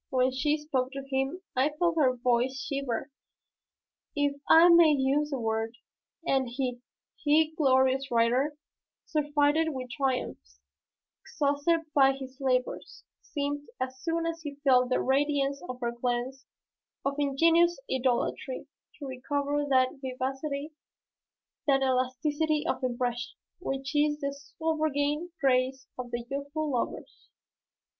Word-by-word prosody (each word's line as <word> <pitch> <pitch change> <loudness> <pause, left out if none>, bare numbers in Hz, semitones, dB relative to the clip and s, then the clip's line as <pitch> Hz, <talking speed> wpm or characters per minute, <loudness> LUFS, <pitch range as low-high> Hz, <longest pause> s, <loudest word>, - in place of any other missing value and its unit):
When 260 -2 +2
she 295 +4 +1
spoke 270 -4 -2
to 275 0 -5
him, 270 +7 -2
I 260 +3 +3
felt 340 -1 +2
her 260 -5 +3
voice 250 +2 +1
shiver, 275 -2 -3 1.0
if 285 -1 +1
I 330 +2 +8
may 340 -2 +8
use 275 +3 +1
the 275 -3 -3
word, 225 +1 -2 0.5
and 265 -5 +1
he, 250 0 -3 0.4
he 310 +1 +3
glorious 265 -2 +3
writer, 245 +5 +2 0.5
surfeited 295 +1 +2
with 255 -1 -6
triumphs, 250 - -3 0.6
exhausted 290 +3 +1
by 270 -1 +5
his 265 -1 -9
labors, 255 -1 -1 0.2
seemed, 290 0 -3
as 260 0 -4
soon 330 0 -1
as 330 0 -3
he 290 -3 -6
felt 255 -2 +4
the 255 - +2
radiance 280 0 +1
of 250 0 -5
her 235 -1 0
glance 245 +2 -3 0.6
of 275 - +1
ingenuous 330 +4 +3
idolatry, 255 0 -1 0.3
to 290 - -8
recover 285 +2 -2
that 260 0 +2
vivacity, 270 +3 -3 1.0
that 270 -1 +4
elasticity 290 +4 0
of - - -1
impression, 245 -1 -2 0.2
which 270 -3 -4
is 295 0 +3
the 280 -1 -2
sovereign 305 +2 -1
grace 260 -1 +1
of 245 -1 -5 0.2
youthful 285 +3 -3
lovers. 245 - -4
275 Hz, 125 wpm, -29 LUFS, 255-295 Hz, 1.0 s, I